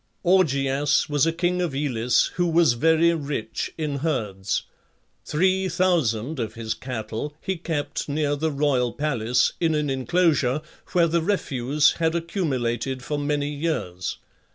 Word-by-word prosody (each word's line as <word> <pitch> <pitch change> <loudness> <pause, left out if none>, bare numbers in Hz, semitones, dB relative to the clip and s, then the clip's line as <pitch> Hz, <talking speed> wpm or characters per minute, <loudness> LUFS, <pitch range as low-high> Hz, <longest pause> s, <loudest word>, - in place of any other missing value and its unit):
Augeas 145 -5 +2
was 145 +1 +2
a - - +3
king 180 +2 0
of 165 -6 -2
Elis 125 -4 +1
who 175 0 +1
was 165 -5 +4
very 160 +6 +3
rich 140 -8 -3
in 150 -3 -2
herds. 105 - -2 0.6
Three 185 +4 +1
thousand 160 -7 +1
of 110 -1 -3
his 115 -1 -3
cattle 125 +3 -5
he 190 - -2
kept 160 -4 -3
near 145 0 0
the 160 +2 -1
royal 140 -5 +1
palace 125 -5 +1
in 165 -2 +2
an 150 -2 0
inclosure 145 -1 +1 0.3
where 175 -2 +5
the 170 0 +1
refuse 150 -6 +2
had 165 0 +1
accumulated 135 - -2
for 150 +2 -2
many 145 0 -1
years. 140 - -3
145 Hz, 140 wpm, -24 LUFS, 125-165 Hz, 0.6 s, where